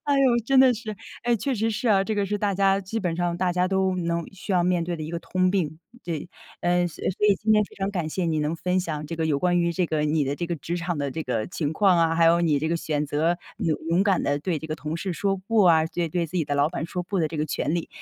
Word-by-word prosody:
哎 290 - +1
哟， 275 - +3 0.2
真 265 +2 +5
的 255 -2 +6
是， 220 -1 -6 0.3
诶， 240 0 +3
确 255 +5 -1
实 225 0 0
是 230 +3 -1
啊， 195 -2 +4
这 220 - -2
个 205 -1 0
是 205 +2 -1
大 205 -1 0
家 195 0 +3
基 200 +4 -4
本 175 -4 -1
上 175 -1 0
大 185 0 +1
家 180 0 +2
都 190 -1 +1
能 170 -1 -1
需 195 +2 -5
要 180 -2 +3
面 175 -1 +1
对 175 - -3
的 - - -5
一 155 - -5
个 170 - -3
通 185 +1 0
病。 160 -5 -1 0.3
对， 165 -2 -4 0.3
呃， 175 0 +2
所 160 - -9
所 205 +3 0
以 205 - +5
今 220 +2 +1
天 210 0 +5
非 - - -17
常 195 0 -2
感 175 -5 -2
谢 180 +3 -2
你 160 -2 0
能 150 +2 -1
分 180 +2 0
享 155 -4 -4
这 165 - -5
个 160 - -1
有 145 -3 +1
关 175 +2 +2
于 170 0 +2
这 180 +1 0
个 155 -1 -1
你 150 -1 +1
的 140 +2 -1
这 170 - -3
个 170 - -2
职 165 +4 -4
场 170 -1 -2
的 140 -1 -2
这 160 +3 -4
个 125 -5 -2
情 155 -4 -3
况 190 +1 +4
啊， 165 -1 +3
还 165 0 +3
有 170 +1 +5
你 155 -4 +2
这 155 - -2
个 170 - +1
选 150 -2 -1
择 160 +4 0 0.2
勇 160 -2 0
勇 175 +3 +3
敢 195 -2 +2
地 145 0 0
对 165 +1 -2
这 160 - -8
个 155 - -3
同 155 +1 -4
事 185 +1 -3
说 195 +3 0
“不” 225 -2 +3
啊， 160 -3 +5
对 170 0 -2
对 170 +1 -1
自 175 +4 -6
己 165 - +1
的 145 - -1
老 145 +1 +3
板 170 - -3
说 180 +1 -4
“不” 195 +2 -2
的 155 - +1
这 160 - -6
个 150 - 0
权 150 +2 -1
利。 170 - -2
175 Hz, 325 characters per minute, -25 LUFS, 160-195 Hz, 0.3 s, 的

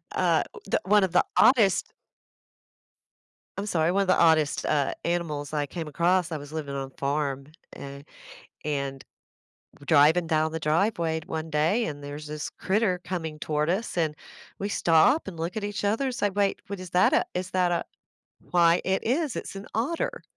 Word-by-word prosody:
Uh, - - +2 0.3
d - - +3
one 205 0 +4
of 185 - 0
the 180 - +3
oddest 220 -8 +4 1.7
I'm 200 - -3
sorry, 165 -4 +1
one 195 +2 +2
of - - -5
the 185 - +4
oddest, 160 -3 +3
uh, 145 -3 +1
animals 160 -4 -2
I 150 -1 -1
came 160 +2 -6
across. 170 +3 +1
I 155 - -2
was 145 +1 -10
living 145 -3 -4
on 135 -1 -3
a - - -32
farm, 140 -1 -2 0.3
and 140 0 -9 0.6
and 140 -2 -3 0.8
driving 160 +3 +5
down 160 -1 +1
the 160 - -2
driveway 165 0 +1
one 160 0 -4
day 160 +10 +1
and 145 -2 -5
there's 145 +1 -7
this 150 0 -5
critter 190 -2 0
coming 160 -4 -4
toward 150 0 -1
us, 195 +2 -2
and 155 -3 0 0.4
we 200 - -3
stop 170 - +3
and 180 -4 -7
look 170 +5 -4
at 205 - -2
each 205 -1 -4
other 215 +7 +1
and 255 -2 -2
say, 205 - +1
"Wait, 200 0 0
what 200 -1 -5
is 185 -2 -9
that 180 +1 +4
a - - +3
is 180 0 -4
that 180 -1 +2
a - - 0 0.7
why 170 -1 +4
it 190 +1 0
is, 275 +2 0
it's - - -6
an 195 - -8
otter." 270 +10 -2
170 Hz, 185 wpm, -26 LUFS, 150-195 Hz, 1.7 s, driving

